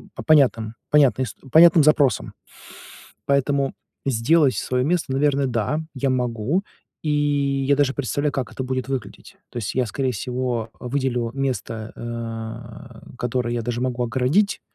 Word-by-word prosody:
по - - -7
понятным, 125 -8 +3 0.2
понятным 140 -3 +4
ис 110 - -8 0.2
понятным 165 +1 +7
запросам. 145 -3 +3 0.9
Поэтому 140 0 +1 0.3
сделать 135 +4 +3
своё 125 0 -1
место, 160 -3 0
наверное, 140 0 +2
да, 120 +5 -1
я 135 0 0
могу, 125 - 0 0.4
и 155 - -1 0.6
я 140 - +4
даже 140 -1 +2
представляю, 145 +3 -1
как 135 -4 -3
это 130 - -4
будет 130 0 -3
выглядеть. 135 -3 -6
То - - -15
есть 110 -3 -3
я, 125 -2 +1
скорее 130 +4 -1
всего, 120 0 -2
э, - - -11
выделю 125 -3 -1
место, 120 -5 -3
э, 115 +1 -7
которое 120 0 -1
я 120 - -2
даже 120 +1 -3
могу 125 -1 -1
огородить, 130 - +1
130 Hz, 145 wpm, -22 LUFS, 120-140 Hz, 0.9 s, понятным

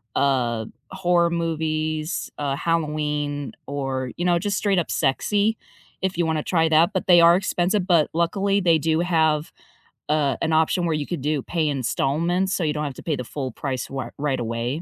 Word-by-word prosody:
uh, 125 -5 +1 0.3
horror 175 -2 +2
movies, 155 -1 -2
uh, 140 -2 -1
Halloween, 150 -3 -1 0.2
or, 135 -2 -3
you 175 - -2
know, 175 -1 +3
just 200 +1 -1
straight 200 -3 +2
up 170 - -3
sexy, 205 +10 +1 0.4
if 190 -1 -1
you 170 - +2
wanna 160 -1 0
try 165 -3 +1
that, 160 +2 +4
but 185 - -1
they 175 -2 +7
are 170 +1 +7
expensive, 185 +1 0
but 170 -5 +3
luckily, 195 +4 +1
they 170 -2 +4
do 160 +1 +1
have, 160 -3 +1 0.6
uh, 150 -3 +1
an 160 -1 0
option 160 +3 +2
where 165 - +1
you 150 -1 -2
could 175 -3 -4
do 150 0 0
pay 165 -3 -1
installments, 155 +7 0
so, 180 - -1
you 150 -2 0
don't 150 - -3
have 140 - -4
to - - -11
pay 160 - -1
the 125 - -4
full 130 +1 -5
price 130 +1 -4
r 135 -1 -5
right 140 -2 -1
away 120 +5 -3
160 Hz, 190 wpm, -23 LUFS, 145-175 Hz, 0.6 s, they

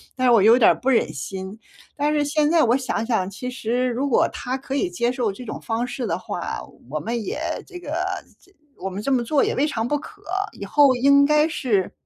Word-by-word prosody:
但 255 0 0
是 245 - +6
我 225 -4 +6
有 230 +3 +7
点 225 - +7
儿 - - +2
不 260 - -6
忍 250 - +2
心。 190 - -6 0.4
但 295 +1 +1
是 295 -1 +2
现 295 +1 +1
在 330 -2 +5
我 240 +2 +3
想 255 -4 -2
想， 220 -7 +1
其 250 +6 -6
实 250 +1 -1
如 255 +4 -1
果 255 - +3
他 250 +2 -4
可 270 0 -5
以 360 +6 +1
接 245 -9 0
受 240 -5 -1
这 250 - -10
种 - - -6
方 230 +2 -2
式 260 -2 -4
的 165 - -1
话， - - -4 0.3
我 155 - -2
们 230 +3 -3
也 - - -3 0.3
这 360 -2 -10
个 315 0 -4 0.4
这 390 - -25 0.3
我 - - -5
们 190 +2 -5
这 275 +6 -1
么 250 -2 +2
做 285 +4 +2
也 - - 0
未 280 - +2
尝 225 -4 -2
不 295 - +1
可。 405 +6 -13 0.4
以 - - -6
后 280 -3 +5
应 280 +3 +5
该 300 +1 +4
是， 235 - 0
255 Hz, 260 characters per minute, -23 LUFS, 225-290 Hz, 0.4 s, 有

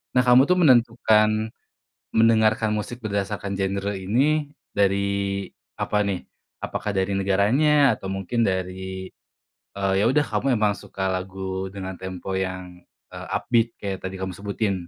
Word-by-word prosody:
Nah 125 - +6
kamu 125 +1 +7
tuh 180 - +4
menentukan, 110 -5 +4 0.7
mendengarkan 110 -1 +4
musik 105 +3 -4
berdasarkan 100 -1 -3
genre 100 +1 -1
ini 140 +11 +1 0.2
dari 100 0 0 0.3
apa 105 -1 0
nih? 95 -3 -2 0.4
Apakah 105 - -3
dari 95 +1 0
negaranya 130 +10 +3
atau 95 - -8
mungkin 95 +5 -1
dari, 95 0 -3 0.7
eee, 95 -1 0
ya 105 - +3
udah 145 +4 +3
kamu 125 +5 +1
emang 105 -2 +1
suka 95 -1 -4
lagu 95 0 -4
dengan 95 -1 -6
tempo 95 0 -5
yang, 90 -1 -5 0.3
eee, - - -8
upbeat 115 -1 +2
kayak 95 -2 -3
tadi 95 - -5
kamu 95 0 -3
sebutin? 100 0 -1
100 Hz, 135 wpm, -24 LUFS, 95-110 Hz, 0.7 s, kamu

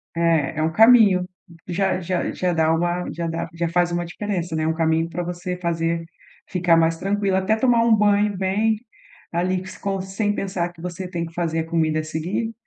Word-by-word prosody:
É, 165 -3 +1
é - - +1
um 160 - +1
caminho. 210 -3 +6 0.4
Já 185 +1 0
já 180 0 -2
já 180 -1 -1
dá 160 -1 +2
uma, 175 +2 -1
já 170 +1 -3
dá 165 0 -3
já 170 0 -1
faz 175 +1 +1
uma 175 0 -1
diferença, 175 -2 -3
né, 155 0 0
um 160 - +1
caminho 160 0 +1
para 175 +2 -3
você 175 +1 -4
fazer 165 -1 -1 0.4
ficar 180 -2 +2
mais 165 0 +2
tranquila, 195 +1 0
até 195 +3 +1
tomar 235 0 +3
um 230 -1 +5
banho 205 -1 +2
bem 205 +3 +1 0.5
ali, 180 +2 0 0.2
com 195 -1 -2
sem 195 +2 -1
pensar 185 -4 -2
que 170 -1 -16
você 180 +1 -5
tem 170 -2 -3
que 165 - -11
fazer 165 -2 -1
a 160 - -2
comida 160 -2 +1
a - - -2
seguir, 170 +9 -3
175 Hz, 200 wpm, -22 LUFS, 165-195 Hz, 0.5 s, caminho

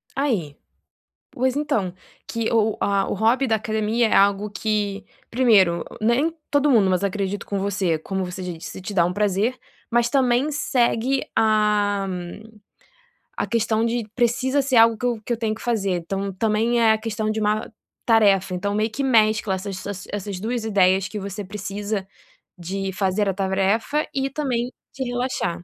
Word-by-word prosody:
Aí, 215 - -1 0.8
pois 255 +1 0
então, 280 -12 -1 0.3
que 230 -1 -2
o 220 -2 +2
a 200 -1 +1
o - - -1
hobby 230 +6 +2
da 225 - +3
academia 220 +2 0
é - - 0
algo 200 +1 +3
que 205 -1 -2 0.2
primeiro 210 -9 +4 0.2
nem 240 +9 +2 0.2
todo 285 0 +3
mundo 210 -6 +4
mas 185 +1 +1
acredito 200 0 -2
com 200 - -2
você, 190 -4 0
como 190 +4 -3
você 180 +1 -6
disse 175 +1 -7
te 205 - -6
dá 175 -4 +4
um 180 - -1
prazer, 210 +5 0 0.3
mas 235 0 +2
também 265 +1 +2
segue 260 -2 +1
a 210 -2 +2 1.3
a - - -1
questão 225 -1 +1
de 230 -1 -1
precisa 255 +3 +1
ser 270 -1 -1
algo 225 0 +6
que 245 - -4
eu 240 -3 -1
que 240 - -1
eu 230 - -2
tenho 220 -2 -1
que - - -13
fazer, 215 -5 0
então 195 +3 -3
também 225 +4 +1
é 225 -1 +5
a - - 0
questão 215 -1 -3
de 220 - -2
uma 215 +1 0 0.3
tarefa, 200 -5 +4
então 200 +3 -2
meio 215 +1 +1
que 275 +5 -3
mescla 215 -5 +3
essas 190 0 -5
essas 200 -2 -6
essas 200 -2 -4
2 230 +3 -2
ideias 190 -3 +3
que 210 - -6
você 200 +1 -5
precisa 200 0 -4 0.5
de 190 +2 -4
fazer 195 +1 0
a - - 0
tarefa 195 +9 0
e 270 0 -1
também 255 -5 -2 0.2
te 265 - -4
relaxar. 245 -8 -2
215 Hz, 170 wpm, -23 LUFS, 195-235 Hz, 1.3 s, algo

